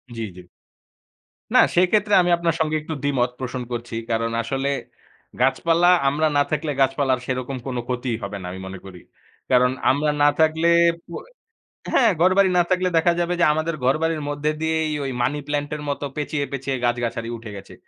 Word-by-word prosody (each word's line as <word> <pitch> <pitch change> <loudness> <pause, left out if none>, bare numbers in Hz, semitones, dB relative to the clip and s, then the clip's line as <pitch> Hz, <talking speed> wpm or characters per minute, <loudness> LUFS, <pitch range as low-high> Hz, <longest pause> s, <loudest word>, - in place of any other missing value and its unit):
জ্বী, 115 -1 -3
জ্বী। 90 -1 -12 1.1
না - - +6 0.2
সেক্ষেত্রে 205 +4 +3
আমি 175 - 0
আপনার 170 -1 0
সঙ্গে 155 -1 0
একটু 160 +1 -6
দ্বিমত 125 -3 +1
পোষণ 130 0 -4
করছি। 120 -1 -5 0.2
কারণ 115 0 0
আসলে 135 +3 -2 0.7
গাছপালা 165 +6 +3 0.2
আমরা 155 +3 +1
না 145 - +5
থাকলে 155 0 -1
গাছপালার 135 -1 +2
সেরকম 130 +1 -3
কোন 125 -2 -3
ক্ষতিই 125 -2 -2
হবে 100 +1 -5
না 90 - -7
আমি 95 - -8
মনে 95 0 -8
করি। 90 -2 -11 0.5
কারণ 125 0 +4 0.2
আমরা 150 +2 +1
না 145 - +7
থাকলে 160 +1 +3 0.4
পু 170 - -12 0.8
হ্যাঁ 235 -5 +5
ঘরবাড়ি 185 +2 +4
না 175 - +5
থাকলে 185 0 +1
দেখা 170 +1 +3
যাবে 175 0 0
যে 175 - +5
আমাদের 155 +1 -2
ঘরবাড়ির 155 +3 +1
মধ্যে 145 +1 -1
দিয়েই 155 -3 -1
মানি 140 +5 0
প্লান্ট 145 0 -2
এর 150 - -7
মত 140 - -3 0.2
পেঁচিয়ে, 150 0 -2
পেঁচিয়ে, 135 0 -3
গাছ-গাছারি 120 -1 -2
উঠে 115 -1 -10
গেছে। 100 - -12
145 Hz, 170 wpm, -22 LUFS, 125-160 Hz, 1.1 s, না